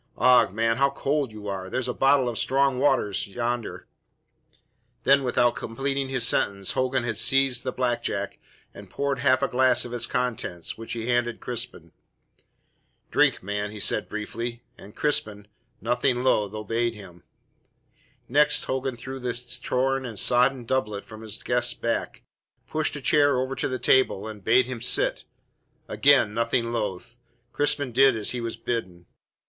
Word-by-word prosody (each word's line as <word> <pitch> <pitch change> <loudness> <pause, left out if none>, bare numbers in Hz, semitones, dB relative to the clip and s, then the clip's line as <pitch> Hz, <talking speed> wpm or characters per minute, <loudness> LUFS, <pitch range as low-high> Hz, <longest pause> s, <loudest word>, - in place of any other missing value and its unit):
Ough, 125 -1 +5
man, 115 +2 0
how 140 +1 +3
cold 140 -1 -1
you 105 -1 -9
are! 95 -1 -4
There's 130 +4 -2
a 125 - -2
bottle 135 0 +3
of 120 -2 -3
strong 135 -1 +1
waters 130 -9 +1
yonder 120 +2 -4 0.7
" 120 0 -39
Then, 140 +2 +5
without 125 -1 +2
completing 135 +3 -3
his 130 -2 +1
sentence, 100 -1 +1
Hogan 130 -1 0
had 115 -3 -3
seized 135 -1 +3
the 130 - -2
black 120 -2 -1
jack 100 -3 -4 0.3
and - - -12
poured 140 -1 -2
half 130 0 +3
a - - +3
glass 125 -1 +3
of 120 - -8
its 120 -1 0
contents, 115 -9 -3
which 115 0 -6
he 115 -1 -4
handed 120 -1 0
Crispin. 120 -9 -5 1.2
"Drink, - - +2
man," 105 +1 -3
he 105 0 -8
said 105 - +1
briefly, 115 +3 -5
and 100 - -14
Crispin, 105 -8 -1 0.3
nothing 125 +1 0
loath, 105 -5 +1
obeyed 115 +2 -2
him. 90 -4 -12 1.1
Next 150 +3 +3
Hogan 130 -1 -3
drew 130 +3 -8
the 125 -1 -3 0.3
torn 135 +1 0
and 115 -4 -7
sodden 125 +2 +2
doublet 105 -5 -2
from 110 -1 -11
his 110 -2 -5
guest's 120 0 +2
back, 115 - -3 0.4
pushed 155 -1 0
a 145 - -5
chair 145 -1 +3
over 130 +1 -2
to - - -1
the 130 - -3
table, 125 -4 +2
and 105 -2 -9
bade 120 +4 +4
him 125 -2 -6
sit. - - +1 0.6
Again, 140 -7 +3
nothing 115 +1 0
loath, 115 +1 -4 0.3
Crispin 145 -1 0
did 135 +1 +5
as 110 -2 -1
he 125 - -4
was 115 -1 -4
bidden. 95 -8 -4
120 Hz, 165 wpm, -25 LUFS, 110-130 Hz, 1.2 s, Ough